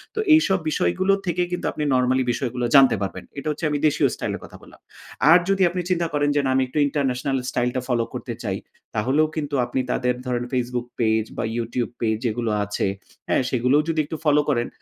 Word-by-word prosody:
তো - - -2
এইসব 195 -12 +4
বিষয়গুলো 155 - +1
থেকে 175 -1 0
কিন্তু 180 - -3
আপনি 150 - -4
নরমালি 130 +1 +2
বিষয়গুলো 125 0 -2
জানতে 135 -4 +7
পারবেন। 95 - -4
এটা 140 - -5
হচ্ছে 150 +2 -4
আমি 150 - 0
দেশীয় 150 -1 +2
স্টাইল - - -3
এর - - -19
কথা - - -13
বললাম। - - -17 0.5
আর 175 - +8
যদি 195 0 +2
আপনি 180 +1 -3
চিন্তা 170 -2 +1
করেন 145 0 +2
যে 145 - +3
"না, - - +1
আমি 130 - +3
একটু 130 - -7
ইন্টারন্যাশনাল 135 -2 -1
স্টাইলটা 125 +1 -1
ফলো 120 -3 +1
করতে - - -5
চাই।" - - -2 0.4
তাহলেও 135 +8 +2
কিন্তু 145 -2 -2
আপনি 120 +2 -2
তাদের 125 -1 0
ধরেন 125 -1 -1
Facebook 125 -1 -2
পেজ 110 -1 +2
বা - - -1
YouTube 120 +1 -2
পেজ 110 -2 +1
যেগুলো 115 0 -1
আছে, 105 0 -2 0.4
হ্যাঁ? - - +2
সেগুলোও 130 +4 +3
যদি 160 -1 0
একটু 160 - -5
ফলো 150 0 +5
করেন, 120 -4 +1
130 Hz, 200 wpm, -23 LUFS, 120-150 Hz, 0.5 s, আর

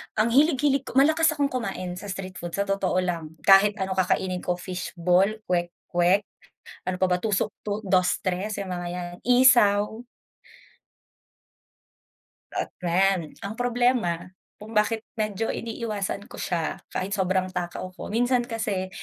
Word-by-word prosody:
Ang 220 +2 +2
hilig-hilig 275 0 +3
ko, - - -7
malakas 315 +4 +4
akong 285 -1 +1
kumain 190 -7 -3
sa - - -9
street 185 -1 -6
food 175 -1 -6
sa 200 - +1
totoo 190 -2 +1
lang. 165 -3 -3
Kahit 200 +1 +6
ano 190 0 -1
kakainin 185 0 +1
ko, 180 - +1
fishball, 180 0 +1 0.2
kwek 175 -1 0 0.2
kwek, 175 +3 +3 0.6
ano 185 0 -3
pa 185 - +3
ba, 180 0 +2
tusok-tu 210 0 -1
dos, 185 -1 +3
tres, 190 +3 -2
yung 200 - -4
mga 175 0 -4
'yan, 175 0 -5
isaw. 235 -3 +4 2.5
At - - -2
friend, 180 -1 +1
ang 200 +2 -4
problema, 245 -8 +1 0.3
kung 215 +2 -11
bakit 220 +1 +1
medyo 215 0 -1
iniiwasan 215 -4 -4
ko - - -10
siya, 170 -3 -2
kahit 190 +2 -3
sobrang 185 -2 +1
takaw 175 0 -4
ko, - - -8
minsan 245 +3 +2
kasi 220 -6 -3
195 Hz, 140 wpm, -25 LUFS, 180-225 Hz, 2.5 s, Kahit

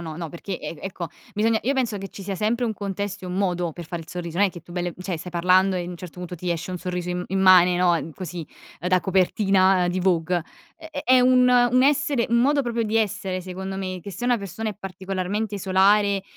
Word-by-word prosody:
no, 160 -2 -6
no, 170 -1 -5
perché 175 +3 -6
e - - -6
e - - -16
ecco, 185 -3 -5 0.2
bisogna, 220 +1 +1
io 270 +4 +1
penso 240 -5 0
che 195 0 -6
ci 195 - -10
sia 195 0 -3
sempre 225 +5 0
un 225 - 0
contesto 200 -1 -4
e - - -5
un 180 - -4
modo 180 -3 0
per 175 +2 -8
fare 170 0 -5
il 160 - -19
sorriso, 170 -2 -6
non 205 - +5
è - - -9
che 175 - -10
tu 175 - -14
bel 175 0 -2
cioè, 185 -1 -3
stai 180 +3 -8
parlando 185 +2 +3
e 175 - -2
a - - -6
un 180 - -7
certo 180 0 -10
punto 180 0 -6
ti 175 +1 -4
esce 170 +2 -3
un - - -3
sorriso 180 0 -4
im 180 0 -2
immane, 185 -2 +6
no, 175 -2 +2
così, 175 -2 -6 0.4
da 180 +3 +2
copertina 190 0 +3
di 180 +1 -1
Vogue. 175 -1 +1 0.3
È 320 -2 -7
è 255 - +6
un 250 0 +5
un 250 0 +4
essere 285 -2 +2
un 235 - +3
modo 280 +3 +3
proprio 235 -2 -1
di 220 0 -1
essere, 190 -4 -1
secondo 190 +1 -6
me, 185 -1 -4
che 200 - -7
se 200 +6 -6
una 245 0 +3
persona 215 +3 -4
è - - -8
particolarmente 195 +2 -3
solare 195 +1 +3
190 Hz, 240 wpm, -24 LUFS, 180-210 Hz, 0.4 s, immane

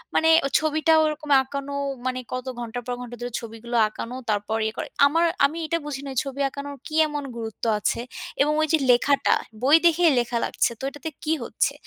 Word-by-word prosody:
মানে 320 - +4 0.2
ও - - +2
ছবিটা 310 +1 +2
ওরকম 305 0 -3
আঁকানো 280 +1 -6 0.3
মানে, 255 0 -1
কত 255 0 -3
ঘণ্টার 240 +1 -5
পর 245 - -1
ঘণ্টা 245 -1 -7
ধরে 245 0 -4
ছবিগুলো 230 +1 -5
আঁকানো 230 +3 -7
তারপর 205 -1 +1 0.2
ইয়ে 220 - -2
করা। - - -3 0.2
আমার 330 +4 +2 0.2
আমি 305 +4 -1
এটা 335 +1 0
বুঝি 280 -2 -5
না, - - -5
এই - - +3
ছবি 275 0 -6
আঁকানোর 280 0 -7
কি 310 - -6
এমন 295 -1 -4
গুরুত্ব 225 0 -6
আছে? 230 - 0 0.4
এবং 295 - +3
ওই 310 - +2
যে, 320 - +6
লেখাটা, 275 +3 +3 0.3
বই 280 +4 +6
দেখেই 335 -1 +5
লেখা 240 0 -1
লাগছে। - - 0
তো - - -10
এটাতে 290 +3 -7
কি 315 0 +1
হচ্ছে? - - 0
280 Hz, 200 wpm, -24 LUFS, 240-305 Hz, 0.4 s, যে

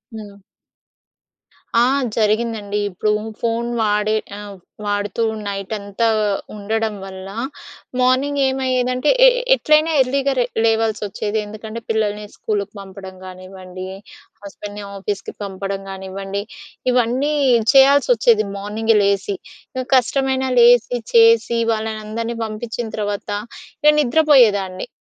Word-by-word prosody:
హ్మ్. 200 -2 -10 1.4
ఆ! - - +5 0.3
జరిగిందండి. 215 -1 0
ఇప్పుడు 210 +3 -1 0.3
ఫోన్ 235 0 -1
వాడే 210 0 +1 0.2
ఆహ్, 205 -1 -9 0.3
వాడుతూ 205 +2 -1 0.2
నైటంతా 200 +2 -2 0.5
ఉండడం 220 +1 -2
వల్ల, 190 0 -8 0.7
మార్నింగ్ 265 +3 +2
ఏమయ్యేదంటే, 255 0 0 0.2
ఎ - - +10 0.3
ఎట్లైనా 310 -4 +3
ఎర్లీగా 275 +1 +1
లే 240 - +3 0.2
లేవాల్సొచ్చేది. 220 -1 0
ఎందుకంటే 215 +2 -8
పిల్లల్ని 210 -1 -1
స్కూల్‌కి 205 -1 -3
పంపడం 190 -1 -10
గానివ్వండి, 185 0 -9 0.6
హస్బెండ్‍ని 205 +1 -8
ఆఫీస్‌కి 200 +1 -4
పంపడం 195 0 -4
గానివ్వండి, 195 +1 -5 0.5
ఇవన్నీ 250 +5 +1 0.4
చేయాల్సొచ్చేది, 245 -5 +5
మార్నింగే 215 +2 0
లేసి. 200 0 0 0.4
ఇక 255 -1 -2
కష్టమైనా 265 +1 0
లేసి, 240 0 +5 0.2
చేసి 230 0 +5
వాళ్ళనందరిని 220 +1 -4
పంపిచ్చిన 225 +2 -5
తర్వాత 205 0 -3 0.5
ఇగ 300 0 +7
నిద్ర 280 +4 +1
పోయేదాన్ని. 200 -8 +4
215 Hz, 100 wpm, -19 LUFS, 200-240 Hz, 1.4 s, ఎ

